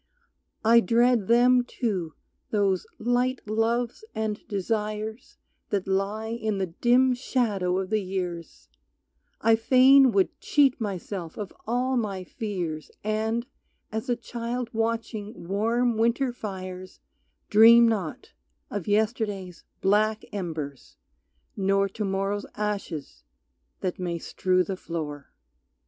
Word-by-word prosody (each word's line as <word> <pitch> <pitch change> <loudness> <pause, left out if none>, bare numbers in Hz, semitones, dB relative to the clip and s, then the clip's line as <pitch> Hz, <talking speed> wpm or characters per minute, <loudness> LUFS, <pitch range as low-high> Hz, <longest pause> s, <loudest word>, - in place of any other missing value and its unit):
I 230 +1 +7
dread 235 0 +3
them 245 +1 +5
too, 195 - -3 0.3
those 200 -3 +1
light 245 +1 0
loves 230 - 0
and 220 -1 -2
desires 215 +2 -3 0.3
That 195 -2 -1
lie 200 +3 -1
in 220 -3 -2
the 190 - 0
dim 245 +8 +3
shadow 215 -8 0
of 190 +1 -3
the 215 -1 +2
years; 180 -3 -5 0.7
I 225 +1 +5
fain 260 +3 +6
would 195 -3 +1
cheat 275 -4 +3
myself 190 -4 -4
of 205 -3 -6
all 250 +3 +1
my 200 -5 -2
fears 180 -6 -4
And, 220 +2 -1 0.5
as 220 +2 -4
a 245 - +3
child 235 0 -4
watching 225 -3 -3
warm 230 +4 +1
winter 240 +3 +1
fires, 185 -4 -7 0.5
Dream 230 +2 +8
not 225 - -3 0.4
of 205 -5 -4
yesterday's 205 -4 -1 0.2
black 215 +2 +2
embers, 155 -8 -5 0.6
nor 195 0 +2
To 210 +3 -4
morrow's 195 +1 -1
ashes 185 - -4 0.6
that 185 -1 -2
may 175 -2 -2
strew 185 +2 +1
the 190 0 -4
floor. 150 -5 -6
215 Hz, 115 wpm, -26 LUFS, 190-235 Hz, 0.7 s, Dream